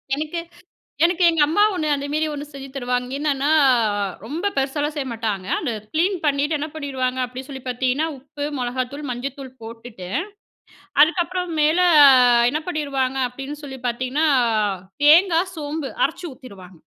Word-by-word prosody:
எனக்கு 310 +3 -3 0.7
எனக்கு 355 +1 +2
எங்க 330 -2 +1
அம்மா 370 +7 +2
ஒண்ணு 310 -4 -2
அந்தமாரி 290 +3 -1
ஒண்ணு 290 0 -5
செஞ்சு 275 -1 -9
தருவாங்க. 250 -1 -2
என்னன்னா 285 -1 0 0.8
ரொம்ப 335 - -2
பெருசாலாம் 290 +3 -1
செய்ய 275 -2 -2
மாட்டாங்க. 210 -4 -3
அத 255 -8 -2 0.2
கிளீன் 365 +4 +2
பண்ணிட்டு 290 +2 +1
என்ன 305 +2 -3
பண்ணிடுவாங்க 260 -4 -3
அப்படின்னு 255 +3 -8
சொல்லி 265 -2 -8
பார்த்தீங்கன்னா, 255 +5 0
உப்பு, 285 +2 -7
மிளகாய்த்தூள், 255 +4 -3
மஞ்சள் 250 +3 -4
தூள் 265 -2 -8
போட்டுட்டு 225 -5 -9 0.9
அதுக்கப்புறம் 350 +2 0
மேல 310 +4 +3 0.7
என்ன 305 +3 -1
பண்ணிடுவாங்க 275 -5 -1
அப்டின்னு 275 +4 -8
சொல்லி 265 -2 -8
பார்த்தீங்கன்னா 255 +6 -1 0.8
தேங்காய், 345 +3 +5
சோம்பு 295 -1 -4
அரைச்சு 355 - -3
ஊத்தீடுவாங்க. 190 -9 -13
280 Hz, 135 wpm, -22 LUFS, 255-310 Hz, 0.9 s, தேங்காய்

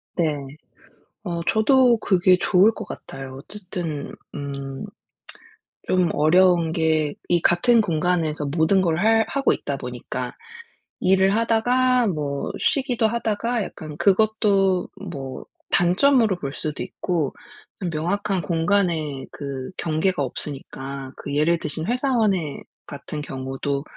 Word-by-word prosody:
네. 160 -4 +1 0.9
어 170 -4 -3
저도 245 +2 +4
그게 185 -2 +4
좋을 190 +3 +4
것 - - -7
같아요. 135 -1 -8
어쨌든 175 -6 -5 0.2
음 140 -2 -5 1.0
좀 180 -2 +2
어려운 170 +1 +4
게 160 -3 +1 0.2
이 175 -1 +4
같은 225 +9 +4
공간에서 160 -4 0
모든 160 +6 +2
걸 165 -3 +1
할 225 +3 +4
하고 275 0 +2
있다 - - -4
보니까 - - -5 0.7
일을 190 +1 +4
하다가 245 +2 +2
뭐 145 -6 -2
쉬기도 255 -5 +1
하다가 230 0 -1
약간 155 -5 -8
그것도 195 -1 +2 0.2
뭐 135 -4 -6 0.3
단점으로 215 +4 +4
볼 140 -3 -4
수도 150 -2 -4
있고 165 -7 -2 0.6
명확한 180 +4 -1
공간에 165 -4 0
그 140 -1 -6
경계가 160 0 0
없으니까 135 0 -6
그 140 - -5
예를 165 +3 +2
드신 160 0 -4
회사원의 220 - 0 0.2
같은 150 +1 -6
경우도 135 0 -3
175 Hz, 235 characters per minute, -23 LUFS, 150-205 Hz, 1.0 s, 저도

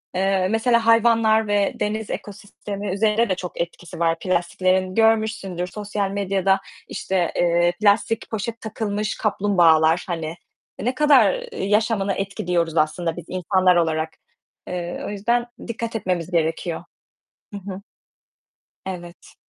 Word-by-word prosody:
Eee, 190 0 +2
mesela 230 0 +2
hayvanlar 225 -1 +4
ve 205 -1 +2
deniz 215 +1 -2
ekosistemi 205 -1 -6
üzerine 215 +2 +2
de 185 - +1
çok 180 -1 -5
etkisi 170 0 -6
var. 165 -1 +1
Plastiklerin 185 +1 0
görmüşsündür. 220 -5 +1
Sosyal 205 0 -3
medyada 195 -1 +1 0.3
işte, 185 -3 -1
eee, 175 0 +3
plastik 215 +2 +2
poşet 225 +1 -4
takılmış 215 -1 -3
kaplumbağalar, 175 -6 +3
hani, 165 -3 -3
eee, 170 +5 -11
ne 255 +1 0
kadar 265 -9 +4
yaşamını 205 -1 +1
etkiliyoruz 175 -4 -1
aslında 160 +2 +1
biz 175 - -7
insanlar 185 0 +2
olarak. 160 -2 +1 0.6
Eee, 175 -1 -4
o - - -4
yüzden 235 +4 0 0.2
dikkat 230 0 -4
etmemiz 180 -4 -2
gerekiyor. 165 0 -1 0.7
Hı - - -4
hı. 190 0 -7 1.0
Evet. 175 -2 -8
195 Hz, 125 wpm, -22 LUFS, 175-215 Hz, 1.0 s, hayvanlar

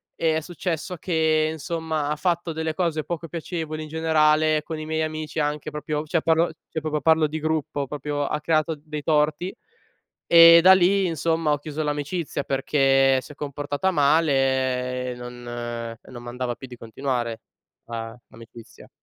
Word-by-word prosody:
e 160 -1 +1
è - - +1
successo 175 +1 -4
che, 160 -2 +1
insomma, 160 -1 -3
ha 150 - 0
fatto 170 +1 -1
delle 160 0 -2
cose 160 -3 -1
poco 170 0 -5
piacevoli 160 -1 -5
in 155 - -9
generale 155 -1 +2
con 160 -1 -6
i 155 - -6
miei 160 0 -1
amici 155 0 -3
anche 150 0 -2
proprio 150 0 -3
cioè 160 +1 0
parlo 165 +1 +2 0.2
cioè - - -3
proprio 150 -1 -2
parlo 160 +1 +4
di 155 +2 -4
gruppo, 155 -2 -1
proprio 145 +1 -3
ha 150 - -2
creato 155 +1 +1
dei 150 -1 -6
torti; 155 +4 +1 0.8
e 170 0 +10
da 190 +2 +8
lì, 190 +1 +3
insomma, 165 -1 0
ho 145 - 0
chiuso 155 +1 -5
l'amicizia 150 +1 -3
perché 135 -1 +3
si 145 - -12
è - - -21
comportata 145 +4 -2
male 130 -5 +1
e - - -10
non 120 0 -9 0.5
e - - -16
non 120 -1 -9
m'andava 120 0 -3
più 130 - -10
di 125 - -10
continuare 120 -1 -3 0.4
la 115 -1 -6
l'amicizia. 115 0 -14
155 Hz, 165 wpm, -24 LUFS, 140-160 Hz, 0.8 s, e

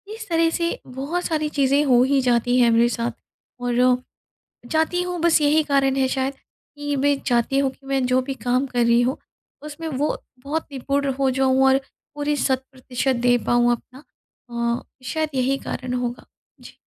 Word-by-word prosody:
इस 445 -1 -9
तरह 330 -1 +3
से 335 0 -1
बहुत 280 +8 -3
सारी 310 -2 -1
चीज़ें 280 +1 +3
हो 250 -3 +5
ही 275 +1 +2
जाती 245 0 +2
हैं 240 -1 +5
मेरे 230 +1 +4
साथ 235 0 -2 0.5
और, 245 +1 +2 0.7
चाहती 320 +3 +1
हूँ 360 -1 -4
बस 340 -1 +4
यही 300 +2 +4
कारण 275 -2 +2
है 265 -1 +2
शायद 265 +1 -1 0.4
कि 290 0 -2
मैं 280 +1 +2
चाहती 240 +2 +1
हूँ 275 -1 +2
कि 270 - -23
मैं 270 -1 0
जो 255 +1 +3
भी 270 +1 -4
काम 250 +2 +1
कर 245 -1 0
रही 235 +1 +4
हूँ 255 +3 0 0.5
उसमें 305 +2 -7
वो 295 0 -1 0.3
बहुत 310 +3 -2
निपुण 280 +1 -1
हो 270 -1 +3
जाऊँ 265 0 +2
और 265 0 +5 0.4
पूरी 295 0 -1
शत 260 -2 0
प्रतिशत 260 0 -2
दे 245 - +5
पाऊँ 240 0 +4
अपना 250 +4 -6 0.8
अ, - - -16 0.2
शायद 315 +5 -1
यही 260 +1 +1
कारण 255 -2 -5
होगा। 245 -1 -3 0.4
जी। - - -12
270 Hz, 180 wpm, -22 LUFS, 250-290 Hz, 0.8 s, हो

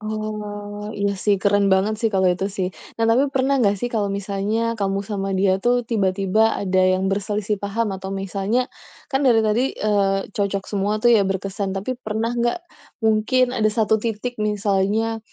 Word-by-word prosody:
Oh, 210 -1 -5
iya 200 0 0
sih, 205 +1 +2
keren 205 -1 +3
banget 210 +3 0
sih, 230 - +1
kalau 190 -4 +2
itu, 185 +2 -1
sih. 190 -2 -3 0.3
Nah, - - +4
tapi 260 +5 +4
pernah 270 +1 +2
nggak 205 -5 +3
sih, 245 +5 -4
kalau 215 -3 0
misalnya 200 +3 -2
kamu 195 -1 -1
sama 195 -1 -3
dia 190 0 +2
tuh, 245 +4 +2
tiba-tiba 205 -1 +1
ada 185 -2 0 0.2
yang 190 +1 0
berselisih 205 +1 -1
paham 205 +2 -2
atau 190 0 -5
misalnya, 195 +6 -1 0.4
kan 270 0 +1
dari 230 -3 +5
tadi, 220 +5 +1
eee, 200 -2 0
cocok 200 -1 -2
semua 205 +1 -1
tuh, 240 - +5
ya, 210 -4 +5
berkesan. 195 +1 -3
Tapi, 240 +6 -3
pernah 220 0 -2
nggak, 240 +5 0 0.4
mungkin 220 +3 +2
ada 220 -4 +1
satu 215 0 +2
titik, 230 +2 -4
misalnya 210 +1 0
210 Hz, 170 wpm, -22 LUFS, 195-225 Hz, 0.4 s, dari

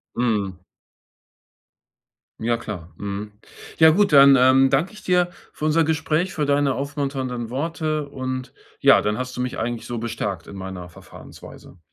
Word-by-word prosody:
Mhm. 105 -7 -1 1.8
Ja 120 +1 +1
klar, 95 -7 -8
mhm. 100 +1 -6 0.5
Ja 160 0 +8
gut, 200 +2 +2
dann, 140 -1 +8
ähm, 130 +1 +5
danke 140 +9 0
ich 215 - -13
dir 180 -1 +2 0.2
für 150 - -5
unser 160 +1 +3
Gespräch, 160 +3 0
für 150 -4 -1
deine 140 -1 +2
aufmunternden 135 -4 -3
Worte 155 +1 -2
und, 130 -2 -5 0.3
ja, - - +6
dann 105 0 -1
hast 125 0 -5
du 125 - -3
mich 125 0 -3
eigentlich 120 0 -3
so 120 - -5
bestärkt 105 -6 -4
in - - -10
meiner 95 -2 -7
Verfahrensweise. 85 +1 -14
130 Hz, 150 wpm, -22 LUFS, 110-155 Hz, 1.8 s, Ja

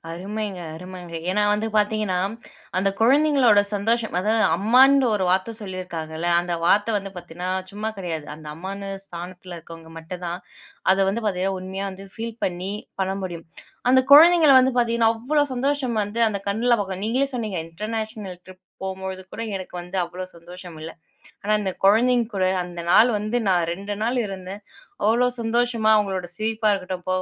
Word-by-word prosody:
அருமைங்க, 200 +2 -4 0.2
அருமங்க. 180 0 -9 0.2
ஏனா 210 +2 +1
வந்து, 210 +2 0
பாத்தீங்கன்னா, 210 -3 +1 0.6
அந்த 190 +2 +2
குழந்தைங்களோட 260 -3 +5
சந்தோஷம் 225 0 0
அதாவது, 220 +3 +2
அம்மான்ற 260 +7 +5
ஒரு 190 -2 0
வார்த்த 190 +5 +1
சொல்லியிருக்காங்கல்ல, 175 -4 -5
அந்த 175 0 -4
வார்த்த 210 +4 +3
வந்து 195 -1 -4
பாத்தீங்கன்னா 175 +1 -6 0.2
சும்மா 210 +2 -4
கெடையாது. 165 -5 -4
அந்த 155 0 -13
அம்மான்னு 195 +3 -6
ஸ்தானத்துல 180 0 -8
இருக்குறவங்க 165 0 -12
மட்டும் 175 +2 -8
தான், 170 +1 -3 0.5
அத 190 - +1
வந்து 225 +4 -1
பாத்தீங்கன்னா 190 -1 0
உண்மையா 190 +1 -5
வந்து, 195 +1 -10
ஃபீல் 230 0 -6
பண்ணி 180 +2 -3 0.3
பண்ண 190 0 0
முடியும். 170 -3 -6 0.5
அந்த 260 - +6
குழந்தைங்கள 320 -2 +8
வந்து 260 0 +2
பாத்தீங்கன்னா 230 -1 +3
அவ்ளோ 290 +6 +1
சந்தோஷம் 260 -3 0
வந்து, 215 +3 -2
அந்த 200 -2 -3
கண்ணுல 235 +4 +2
பாக்கலாம், 190 -1 -4
நீங்களே 260 +5 +1
சொன்னீங்க, 215 -8 -2
"இன்டர்நேஷனல் 215 0 -5
ட்ரிப் 185 0 -15 0.2
போகும்பொழுது 190 0 -5
கூட 230 - -5
எனக்கு 185 -1 -8
வந்து 180 +2 -7
அவ்ளோ 180 +2 -7
சந்தோஷம் 175 -1 -11
இல்ல. 160 +1 -6 0.5
ஆனா, 210 - -1
அந்த 190 -2 -1
குழந்தைங்க 235 +3 +4
கூட, 185 - +2 0.2
அந்த 175 -1 -7
நாள 225 - +8
வந்து 215 +3 -1
நான் 175 -2 +2
2 200 +3 -5
நாள் 245 +2 0
இருந்தேன். 195 +1 -8 0.4
அவ்ளோ 235 +3 +4 0.2
சந்தோஷமா 230 -1 +1
அவங்களோட 190 -4 -1
சிரிப்பா 220 0 +1
இருக்கட்டும், 185 -2 -5
போக, 185 0 +1
195 Hz, 160 wpm, -23 LUFS, 180-225 Hz, 0.6 s, குழந்தைங்கள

